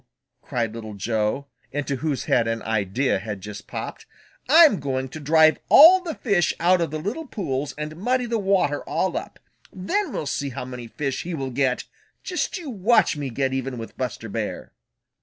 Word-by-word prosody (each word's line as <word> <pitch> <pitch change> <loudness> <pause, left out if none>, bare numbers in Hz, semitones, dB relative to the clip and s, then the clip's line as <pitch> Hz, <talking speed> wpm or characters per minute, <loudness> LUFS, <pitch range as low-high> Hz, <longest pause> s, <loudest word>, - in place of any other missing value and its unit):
cried 115 -3 -2
Little 110 -2 -7
Joe, 110 +6 -1 0.3
into 140 -1 -2
whose 150 -1 -2
head 115 -2 +2
an 115 0 -2
idea 110 +2 0
had 105 0 -5
just 100 +1 -9
popped. - - -6 0.4
"I'm 310 - +7
going 130 -1 -2
to 155 - -8
drive 155 +1 +4
all 355 +5 +9
the 335 -4 -5
fish 195 - +1
out 175 +1 +4
of 165 - 0
the 155 - -4
little 215 - -4
pools 145 - -3
and 150 +1 -5
muddy 250 +6 0
the 230 -1 -1
water 190 -7 +1
all - - -1
up. - - -5 0.3
Then 305 - -2
we'll - - -3
see 140 0 -2
how 125 - -6
many 125 -2 -7
fish 135 +3 -3
he 175 0 -4
will 135 -3 -4
get! 130 0 0 0.4
Just 365 +2 -2
you 320 -7 -6
watch 220 -1 +3
me 145 -2 -4
get 130 +2 -1
even 130 -1 -3
with 115 -1 -8
Buster 125 -3 -4
Bear." 110 0 -4
140 Hz, 185 wpm, -24 LUFS, 120-190 Hz, 0.4 s, all